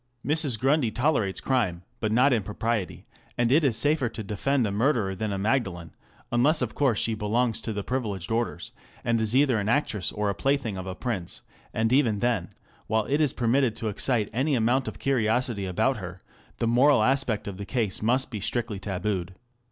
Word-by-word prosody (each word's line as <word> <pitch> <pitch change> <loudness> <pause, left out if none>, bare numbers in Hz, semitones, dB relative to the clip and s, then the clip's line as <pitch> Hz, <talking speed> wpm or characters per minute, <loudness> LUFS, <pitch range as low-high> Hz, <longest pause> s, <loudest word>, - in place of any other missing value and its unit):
Mrs. 145 -4 +1
Grundy 135 -1 +2
tolerates 120 -6 0
crime, 105 -10 0 0.2
but 110 -2 -1
not 125 +5 +4
impropriety; 110 -1 -2 0.3
and 120 0 +2
it 155 +4 +5
is 125 -6 +2
safer 145 -4 +2
to 110 - -6
defend 120 +6 0
a 100 - -1
murderer 110 -2 +1
than 105 +2 -3
a 100 - -2
Magdalen, 95 -6 -1 0.4
unless 135 +5 +3
of 115 - -3
course 130 -7 +1
she 115 - 0
belongs 110 +2 0
to 115 - -4
the 100 -1 -3
privileged 105 -8 -3
orders, 115 0 -2 0.3
and 115 -1 +1
is 110 +2 +1
either 130 -4 +4
an 100 +1 -2
actress 115 -7 0
or 105 -1 -1
the - - 0
plaything 135 +1 0
of 95 0 -6
a 95 - -4
prince; 105 -9 -4 0.3
and 110 +2 0
even 125 -6 +3
then, 105 -6 0 0.4
while 110 -1 +1
it 145 +3 +1
is 150 -4 +3
permitted 120 0 +1
to 115 -1 -3
excite 110 0 0
any 135 +4 +1
amount 125 +3 +1
of - - -5
curiosity 115 -5 0
about 130 +8 +1
her, 95 -2 -7 0.4
the - - -1
moral 125 +1 +4
aspect 130 -4 0
of 100 -2 -5
the 100 - -5
case 115 -7 -1
must 125 +5 +1
be 110 - -4
strictly 110 0 -2
tabooed. 95 -1 -3
115 Hz, 190 wpm, -26 LUFS, 105-130 Hz, 0.4 s, it